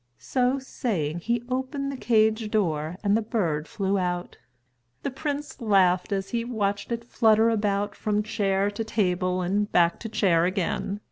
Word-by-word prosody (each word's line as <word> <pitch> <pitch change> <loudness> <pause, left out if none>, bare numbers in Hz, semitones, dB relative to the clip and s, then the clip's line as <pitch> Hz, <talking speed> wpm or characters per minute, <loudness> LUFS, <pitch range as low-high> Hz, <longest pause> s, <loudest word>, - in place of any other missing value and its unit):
So 255 +1 0
saying, 190 - -2
he 235 +6 -1
opened 265 +2 -2
the - - -5
cage 220 -3 +2
door 165 -6 0
and 205 0 +3
the 225 - +2
bird 170 -9 -1
flew 195 -1 -1
out. 175 -1 -3 0.6
The - - -2
prince 290 +1 -4
laughed 190 -4 +3
as 195 -1 -1
he 235 -1 -1
watched 205 -3 -2
it 235 0 -3
flutter 225 -1 +4
about 205 -2 0
from 210 0 -1
chair 200 -2 0
to 205 +2 -3
table 185 -4 0
and 200 +4 0
back 170 -1 +3
to 225 - -6
chair 175 -6 +3
again. 195 +2 -1
205 Hz, 160 wpm, -26 LUFS, 185-230 Hz, 0.6 s, flutter